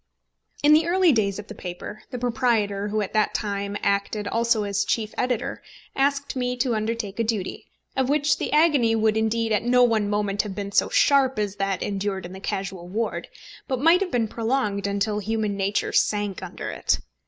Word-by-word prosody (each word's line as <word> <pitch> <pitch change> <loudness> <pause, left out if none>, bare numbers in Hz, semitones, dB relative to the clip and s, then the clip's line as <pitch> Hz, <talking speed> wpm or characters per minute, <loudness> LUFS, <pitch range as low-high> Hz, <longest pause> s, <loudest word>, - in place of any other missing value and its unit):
In 295 +1 +7
the 315 +2 +4
early 365 -1 +4
days 200 -6 +1
of 210 - -7
the 215 - -9
paper, 185 +3 -7
the 250 - -5
proprietor, 220 -4 0
who 215 +1 -1
at 205 - -4
that 215 -1 +1
time 200 -1 -2
acted 200 +1 0
also 230 0 +1
as 200 0 0
chief 215 +1 -1
editor, 250 -3 -2 0.3
asked 280 +1 0
me 250 -1 -1
to 245 -1 +1
undertake 220 -1 -3
a - - +3
duty, 215 -4 -3 0.3
of 265 -1 +1
which 290 0 +2
the - - -2
agony 290 -7 +4
would 220 -1 +2
indeed 220 +1 0
at 210 - +2
no 250 +1 +4
one 220 -4 +2
moment 205 -1 0
have 205 -3 -6
been 200 -1 -4
so - - +3
sharp 270 -3 +3
as 205 -1 -2
that 195 -2 -1
endured 195 -2 -2
in 180 - -8
the 190 - -8
casual 190 -2 -4
ward, 220 +5 -3 0.4
but 260 -3 -1
might 330 +6 +5
have 390 - 0
been 235 -6 0
prolonged 220 -3 -1
until 200 +1 0
human 215 0 -1
nature 195 +1 -1
sank 205 -2 +1
under - - -6
it. - - 0
215 Hz, 195 wpm, -24 LUFS, 200-250 Hz, 0.4 s, In